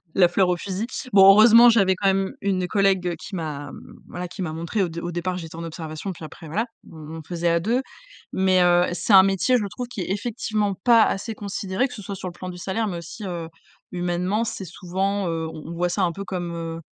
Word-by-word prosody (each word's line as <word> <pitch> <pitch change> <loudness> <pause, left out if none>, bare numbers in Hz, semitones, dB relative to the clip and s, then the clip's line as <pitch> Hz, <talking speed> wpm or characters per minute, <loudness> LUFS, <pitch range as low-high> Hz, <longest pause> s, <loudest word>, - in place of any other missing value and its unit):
la 180 -2 +5
fleur 185 +1 +2
au 180 - +2
fusil. 190 +4 -4 0.3
Bon, 195 -2 +7
heureusement, 230 +3 +8
j'avais 195 -5 +4
quand 195 +2 0
même 195 0 +1
une 190 -2 0
collègue 190 -3 +1
qui 160 +5 -8
m'a 145 -4 -5
mmh, - - -13
voilà 180 0 -6
qui 190 - -8
m'a 160 -4 -3
montré 170 +6 -2
au - - 0
dé 170 0 -6
au 175 - -4
départ, 175 +1 -2
j'étais 165 -2 -8
en 165 - -5
observation 160 +2 -6
et - - -6
puis 165 - -12
après 155 +1 -10
voilà, 210 +10 -1 0.2
on 160 0 -9
on - - -7
faisait 175 -1 -1
à 170 0 +3
2. 230 +9 0 0.5
Mais 185 -1 +3
heu, 175 0 +4
c'est 200 - 0
un 190 -1 +10
métier, 195 +5 +2
je 215 - -2
trouve 245 +6 -6
qui 235 -5 -6
est - - -4
effectivement 210 -1 -1
pas 235 -2 +7
assez 215 +3 -2
considéré, 200 +3 -2
que - - -10
ce 210 - -8
soit 200 0 -6
sur 185 -1 -5
le - - -12
plan 185 +1 -7
du 180 - -8
salaire, 195 +5 -2
mais 180 -4 -3
aussi, 175 +5 -9
heu, 170 -3 -5 0.4
humainement, 180 +5 -1
c'est 200 -3 -5
souvent 190 +3 -2
heu, 165 -1 -2
on 155 -1 -9
on - - -5
voit 175 +1 0
ça 190 +2 0
un 170 -2 +1
peu 195 - -6
comme 175 -3 -4
heu 165 0 -5
185 Hz, 250 wpm, -23 LUFS, 170-200 Hz, 0.5 s, un